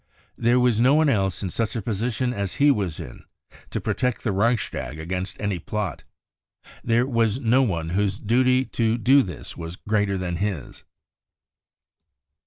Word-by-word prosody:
There 120 +1 +3
was 120 -3 +3
no 130 +4 +5
one 155 -1 +4
else 95 -7 0
in 95 - -3
such 115 0 -2
a 115 - -1
position 120 +4 -1
as 100 -4 -3
he 145 +1 +5
was 95 - -2
in - - -9 0.5
to - - -3
protect 125 -2 -1
the 110 - 0
Reichstag 100 - -1
against 90 +3 -4
any 100 -4 -1
plot. 105 +3 -4 0.8
There 120 +1 +2
was 115 -3 +1
no 125 +1 +3
one 85 -10 -1
whose 100 +2 0
duty 125 +4 +2
to 115 -2 0
do 130 +5 +5
this 90 - -7
was 80 +1 -7
greater 105 -1 0
than 90 -2 -3
his. 95 -8 -4
110 Hz, 160 wpm, -24 LUFS, 95-125 Hz, 0.8 s, no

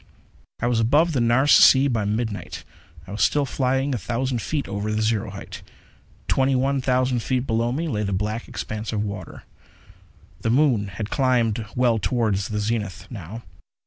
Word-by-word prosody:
I - - 0
was 120 -2 +1
above 145 +9 +3
the 130 - +1
Nares 120 +5 +3
Sea, 135 +1 +7
by 115 -6 0
midnight. 110 0 -3 0.4
I 95 - -11
was 105 - -4
still 145 -1 +2
flying 135 +1 0
a 120 - -2
thousand 120 +4 -2
feet 150 +3 -2
over 100 +1 -3
the 110 +1 0
zero 110 -1 0
height. 100 0 -9 0.7
Twenty 135 0 +2
one 135 +1 +1
thousand 125 -1 +1
feet 130 +2 -1
below 115 -1 0
me 160 +6 -2
lay 105 -8 -2
the 100 -1 -2
black 105 +4 -2
expanse 110 0 -5
of 105 -2 -1
water. 100 -4 -7 1.0
The - - -1
moon 125 -5 +3
had 100 +3 -6
climbed 120 -5 +1
well 120 -3 +2
toward 110 +2 0
the 100 +2 -2
zenith, 105 -2 -3
now. 110 +1 -8
115 Hz, 175 wpm, -23 LUFS, 105-130 Hz, 1.0 s, Sea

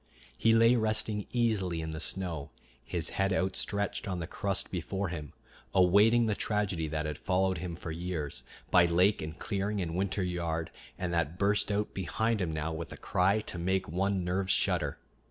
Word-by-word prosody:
He 115 - +4
lay 115 +2 +6
resting 110 -2 0
easily 105 -8 +1
in 80 0 -4
the 80 - -5
snow, 85 -5 -2 0.3
his - - -2
head 95 0 0
outstretched 100 +2 -1
on 95 -2 -2
the 85 - -3
crust 100 +2 -1
before 95 +2 -2
him, 75 -5 -6 0.4
awaiting 105 +6 +5
the 110 - +1
tragedy 100 -6 -1
that 75 0 -2
had 75 -1 -4
followed 95 -2 +1
him 85 0 -4
for 80 - -6
years, 80 -3 -2 0.3
by 90 -1 +6
lake 90 +5 +3
and 80 +2 -6
clearing 100 0 -2
and 85 -3 -2
winter 95 +1 0
yard, 85 -2 -2 0.3
and 90 -1 -2
that 85 0 0
burst 105 +1 +2
out 105 +1 -1
behind 110 +4 0
him 85 -3 0
now 80 +1 -2
with 80 +1 -5
a - - -7
cry 95 +4 +2
to 90 - -5
make 95 +2 0
one's 95 +2 0
nerves 95 +2 0
shudder. - - +1
95 Hz, 180 wpm, -31 LUFS, 85-100 Hz, 0.4 s, lay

